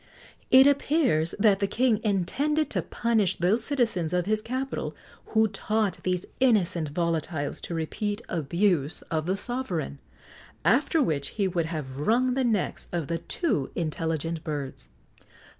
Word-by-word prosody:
It 260 +1 +8
appears 280 - +2
that 200 -2 +4
the 200 - +1
king 225 +1 +1
intended 275 - 0
to 185 - 0
punish 220 +2 +1
those 200 +7 +1
citizens 225 - 0
of 180 -1 +1
his 215 +1 +1
capital 260 +4 -3 0.3
who 220 0 +3
taught 210 0 -1
these 180 -1 -1
innocent 185 - +2
volatiles 160 -3 -2
to 170 - -4
repeat 205 +6 -2
abuse 170 -1 0
of 160 0 -1
the 190 +2 0
sovereign, 195 - -3 0.7
after 280 - +3
which 140 - -1
he 200 -2 +2
would 170 -3 -1
have 145 -5 -5
wrung 245 - +2
the 265 +1 +1
necks 220 -6 -1
of 170 -4 -3
the 165 0 -1
too 165 - -1
intelligent 165 0 -2
birds. 145 -4 -5
190 Hz, 140 wpm, -27 LUFS, 165-235 Hz, 0.7 s, It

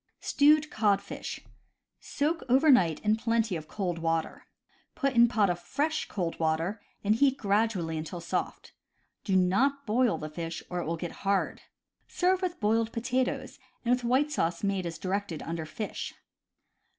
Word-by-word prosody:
Stewed 300 +1 +4
Codfish. 200 -2 -1 0.3
— - - -56 0.2
Soak 315 +3 +1
over 275 +5 +6
night 170 - +4
in 215 +1 +2
plenty 230 -3 0
of 155 -2 -6
cold 180 -3 -3
water. 165 -1 -2 0.5
Put 275 -2 0
in 235 -1 +6
pot 220 -4 +2
of 175 -1 -1
fresh, 300 - -1
cold 175 -4 -3
water, 165 +6 0 0.2
and 210 +1 +3
heat 270 +3 +3
grad 210 +1 +2
ually 165 -4 -3
until 160 +3 -6
soft. 170 - -4 0.5
Do 195 - 0
not 255 +11 +2
boil 230 -3 +2
the 155 - -5
fish 165 +2 -5
or 180 - -1
it - - -3
will 165 +1 -1
get 170 0 -5
hard. 195 0 0 0.5
Serve 370 +1 +1
with 360 -1 -2
boiled 225 +1 +1
potatoes, 250 +3 -2 0.3
and 240 - +4
with 250 0 0
white 260 +5 +2
sauce 170 - -1
made 195 -3 0
as 165 -1 -5
directed 185 -2 -3
under 165 -1 -4
Fish. 205 +7 -5
205 Hz, 165 wpm, -29 LUFS, 170-250 Hz, 0.5 s, over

